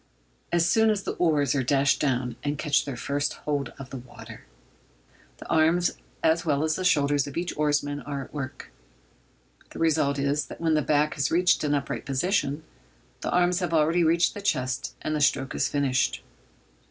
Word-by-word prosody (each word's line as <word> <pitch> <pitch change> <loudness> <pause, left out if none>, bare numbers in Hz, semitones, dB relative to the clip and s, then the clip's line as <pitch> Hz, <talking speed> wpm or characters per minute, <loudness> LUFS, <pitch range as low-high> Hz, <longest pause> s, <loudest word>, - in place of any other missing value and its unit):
As 170 -1 +2
soon 220 +4 +4
as 205 -2 0
the - - -2
oars 150 -6 +2
are 140 - +1
dashed 135 +2 +2
down 125 -4 0
and 145 0 -2
catch 150 -1 +1
their 135 -4 -5
first 145 +4 -1
hold 145 -3 -1
of 135 -1 -10
the 135 - -5
water, 115 -2 -12 0.9
the - - -11
arms 165 +2 +3 0.3
as 165 +1 +3
well 150 -2 +1
as 155 -1 +1
the 185 - -3
shoulders 145 -5 +2
of 140 - -7
each 175 +1 -2
oarsman 145 -1 0
are 140 -2 -5
at - - -15
work. 140 -3 -6 1.0
The - - -11
result 155 -3 +1
is, 140 0 0
that - - -10
when 165 -1 +1
the 155 - +3
back 150 +1 +1
has 140 - 0
reached 180 +1 +3
an 145 -1 +1
upright 140 -1 -4
position, 145 +1 0 0.6
the - - -4
arms 180 0 +2
have 175 -3 -1
already 160 +3 +3
reached 165 +2 +3
the 205 - -7
chest, 130 -9 -1
and 155 - -1
the 150 - -1
stroke 135 -2 +1
is - - 0
finished. 135 -3 0
145 Hz, 190 wpm, -26 LUFS, 140-165 Hz, 1.0 s, soon